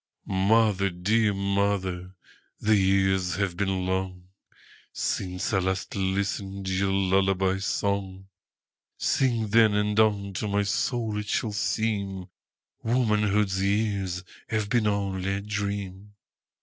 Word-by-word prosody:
Mother, 100 0 +2
dear 105 +5 +1
mother, 100 -2 -1 0.4
the 110 +1 +3
years 95 -2 +2
have 95 -2 -1
been 95 -1 -1 1.1
longSince 90 +3 -2
I 95 - +3
last 95 +1 -2
listened 95 0 -2
your 95 +1 +1
lullaby 95 0 +2
song:Sing, 95 -1 -2 1.2
then, 110 -1 +5
and 105 +1 +1
unto 100 -2 +1
my 100 0 +1
soul 110 +1 -1
it 105 - -6
shall 110 +1 -1
seemWomanhood's 105 0 -1
years 100 -2 0 0.3
have 110 -2 -1
been 115 -2 +2
only 95 -2 -1
a 100 - -3
dream. 100 -1 -4
100 Hz, 100 wpm, -26 LUFS, 95-105 Hz, 1.2 s, then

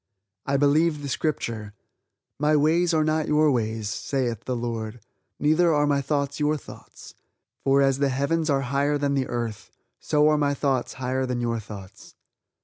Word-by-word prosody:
I 140 0 +2
believe 150 +2 +2
the - - -4
Scripture: 115 -7 -3 0.6
"My 150 +1 +3
ways 165 +4 +3
are 160 -2 +2
not 155 0 0
your 150 0 +4
ways, 110 -3 -1
saith 120 0 -2
the 130 - -2
Lord; 115 -1 -4 0.4
neither 155 +3 +3
are 145 0 +3
my 140 -1 +2
thoughts 140 0 -2
your 150 +1 +1
thoughts, - - -13 0.5
for 140 +1 +4
as 135 0 +2
the 140 -1 +2
heavens 155 +5 0
are 135 -1 +2
higher 140 +3 0
than 140 -1 0
the 135 -2 0
earth, 115 -3 -4 0.3
so 150 0 +2
are 150 -1 +2
my 145 -1 +1
thoughts 135 -3 -1
higher 130 0 -2
than 125 -1 -2
your 115 -1 -1
thoughts." 100 -3 -11
140 Hz, 170 wpm, -25 LUFS, 120-150 Hz, 0.6 s, your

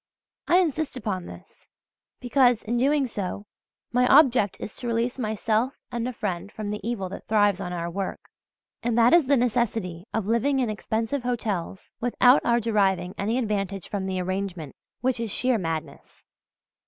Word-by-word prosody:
I 350 - +5
insist 315 -6 0
upon 190 -7 -3
this, - - -14 0.5
because, 245 -2 +3
in 235 +2 -1
so 260 - +3
doing, 230 -9 -1 0.5
my 250 +1 +3
object 255 -8 +5
is 205 - -6
to 245 - -5
release 235 +2 -1
myself 220 +2 0 0.2
and 240 0 -2
a - - -2
friend 200 -5 -4
from 215 -2 -5
the 210 - -3
evil 210 -3 -3
that - - -9
thrives 205 -3 +3
on 180 -2 -4
our 170 -1 -3
work, 190 +2 -4 0.6
and 235 -1 0
that 235 +3 +5
is 340 -6 +5
the 280 0 +4
necessity 225 -7 -1
of 220 -3 -1
living 235 +6 +1
in 245 -4 0
expensive 225 +5 -2
hotels 215 -7 -3
without 245 +2 +5
our 235 0 +3
deriving 195 -5 +1
any 220 +5 -1
advantage 200 -5 -2
from 195 -2 -3
the 190 -1 -2
arrangement 185 -5 -4 0.3
which 255 -1 0
is 230 -3 -2
sheer 250 0 +3
madness. 165 -3 -6
225 Hz, 165 wpm, -25 LUFS, 195-245 Hz, 0.6 s, I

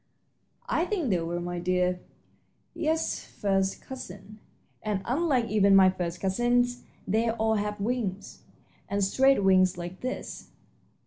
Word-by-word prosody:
"I 345 -8 +1
think 350 - -1
they 180 - +2
were, 170 +1 -3
my 175 0 -4
dear. 180 0 +1 0.7
Yes, 320 0 -1
first 195 -1 -1
cousins, 215 -4 -9 0.4
and, 205 -3 -2
unlike 265 -2 +1
even 200 -3 +4
my 190 -1 +7
first 175 -2 -4
cousins, 245 +5 +1 0.3
they 225 +4 +1
all 220 -1 +1
have 210 0 -3
wings, 205 -3 -3 0.5
and 200 0 0
straight 265 +3 +3
wings 185 -1 +4
like 175 +1 -7
this." 255 - -5
200 Hz, 130 wpm, -27 LUFS, 185-245 Hz, 0.7 s, my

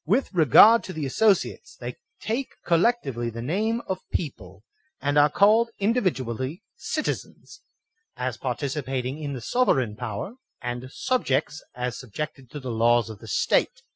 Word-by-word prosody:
With 215 - +1
re 165 -4 +4
gard 220 - +8
to 185 - -6
the 155 -4 -3
asssociates, 200 +8 +1
they 120 0 -6 0.2
take 240 +5 -3
collectively 165 - +1
the 115 0 -6
name 220 - 0
of 190 -1 -3
PEOPLE, 100 - -5 0.4
and 145 0 -1
are 145 +1 +6
called 215 +8 +4
individually 160 - -1
citizens, 310 0 -4 0.6
as 125 -1 -2
par 125 -1 -2
ticipating 135 0 -3
in 140 -1 -3
the 130 - -6
sovereign 130 - +1
power, 120 - -5 0.2
and 125 +1 -5
subjects, 150 - 0
as 125 -1 -3
sub* 125 -6 -12
THE - - -11
SOVEREIGN 150 - 0
15 135 - -17
jected - - -33
to 150 - -7
the 130 -3 -5
laws 115 0 +3
of 105 - -11
the - - -12
State. - - +1
140 Hz, 170 wpm, -25 LUFS, 125-200 Hz, 0.6 s, gard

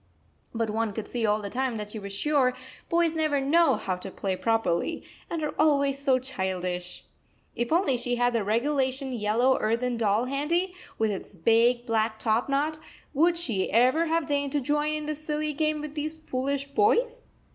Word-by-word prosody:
But 230 -2 -1
one 220 -1 -1
could 220 +1 -5
see 235 -3 -1
all 210 0 +1
the 200 - -5
time 255 -2 -1
that 210 0 -6
she 220 - -6
was 200 -1 -7
sure 255 +4 +1 0.3
boys 335 -1 +2
never 310 -3 +1
know 290 +1 +4
how 185 - -2
to 180 - -8
play 190 0 -3
properly, 225 - 0 0.3
and 330 -2 -3
are 300 - -2
always 280 -2 +3
so 275 -2 +3
childish! 185 -7 -4 0.5
If 240 0 -2
only 325 -6 +3
she 245 +1 -1
had 245 0 +2
the 230 -3 +1
regulation 260 +4 0
yellow 235 +4 +2
earthen 235 +2 0
doll 220 +1 +2
handy, 325 +8 0 0.2
with 220 -1 +1
its 195 0 -7
big, 230 +6 +3
black 220 -1 0
top 225 +3 0
knot, 300 +3 0 0.3
would 335 +4 +3
she 230 - -1
ever 255 +9 +4
have 325 -1 +1
deigned 285 -2 -1
to 295 - +2
join 295 +3 0
in 305 0 -4
this 305 0 -5
silly 305 0 -2
game 305 0 0
with 300 -1 -6
these 310 +1 -4
foolish 275 -2 -2
boys? 465 - +2
260 Hz, 185 wpm, -27 LUFS, 225-300 Hz, 0.5 s, know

